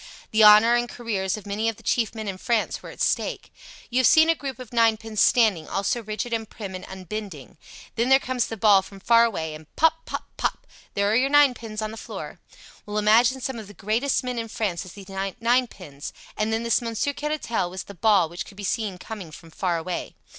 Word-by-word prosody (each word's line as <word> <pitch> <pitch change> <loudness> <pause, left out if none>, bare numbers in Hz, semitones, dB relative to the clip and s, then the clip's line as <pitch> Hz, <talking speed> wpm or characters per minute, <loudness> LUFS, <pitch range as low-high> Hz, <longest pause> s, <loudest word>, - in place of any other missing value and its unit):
The 220 0 +4
honour 210 +2 +8
and 240 0 +1
careers 210 -5 -2
of 210 - -11
many 210 +3 -1
of 225 - -4
the - - -18
chief 230 -2 0
men 220 -1 -5
in 190 -1 -4
France 235 0 0
were - - -10
at - - -10
stake. - - -1 0.4
You 250 - +2
have 255 - +5
seen 320 +1 +6
a - - +6
group 275 -3 -6
of 250 -2 -11
ninepins 225 -2 +2
standing, 215 -10 +3
all 195 - -2
so 235 +4 0
rigid, 215 +2 -4
and 225 -1 -2
prim, 200 -4 -7
and 185 0 -7
unbending. 190 -6 -8 0.4
Then 235 +3 +1
there 265 - +8
comes 255 -3 -1
the 225 - -6
ball 205 -2 +5
from 195 +1 -13
far 230 +3 +5
away 160 -9 -3
and 155 0 -11
pop, 320 +1 +2
pop, - - -4
pop - - -2 0.3
there 200 +1 +2
are - - +2
your 260 +3 +3
ninepins 245 -7 +3
on 215 - -3
the 225 - -9
floor. - - -8 0.5
Well, 210 0 -3
imagine 230 +5 +4
some 255 -2 -3
of 215 - -9
the 205 - -13
greatest 235 +8 0
men 250 -1 -3
in 230 - -4
France 200 -5 -3
as 185 - -11
these 195 -2 -12
ninepins 195 - -2 0.2
and 215 +1 -1
then 225 +1 -1
this 235 +1 +2
Monsieur 230 +4 -2
Caratal 290 -10 -2
was 185 +1 -6
the 200 - -11
ball 200 -1 +3
which 170 +2 -6
could 195 - -14
be 205 - -7
seen 205 -1 -2
coming 195 -3 -8
from 165 +2 -13
far 175 +1 -1
away. 175 +2 -5
220 Hz, 225 wpm, -24 LUFS, 195-235 Hz, 0.5 s, honour